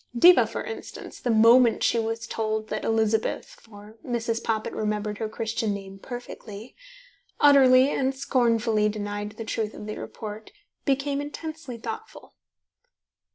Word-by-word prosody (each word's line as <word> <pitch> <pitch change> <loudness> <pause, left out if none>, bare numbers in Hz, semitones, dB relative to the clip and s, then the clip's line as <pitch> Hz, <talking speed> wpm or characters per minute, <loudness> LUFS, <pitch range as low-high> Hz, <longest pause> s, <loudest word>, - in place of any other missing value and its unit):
Diva, 355 +9 +7
for - - -5
instance, 455 - -8
the 245 - -3
moment 230 +1 +5
she 235 - +3
was 225 0 -3
told 220 -1 -2
that 215 - -3
Elizabeth 220 -1 +1
(for 215 0 -15
Mrs. 230 -1 -2
Poppit 220 -1 -1
remembered 210 -1 -2
her 220 - -2
Christian 220 -1 -2
name 195 -1 -9
perfectly) 235 -2 -9 0.6
utterly 270 -2 +6
and 265 0 0
scornfully 230 -5 +2
denied 205 0 -4
the 225 +1 -7
truth 215 0 -3
of - - -8
the 215 - -6
report, 215 0 -8 0.3
became 280 0 0
intensely 300 -3 -7
thoughtful. 230 - -8
225 Hz, 135 wpm, -26 LUFS, 215-255 Hz, 0.6 s, Diva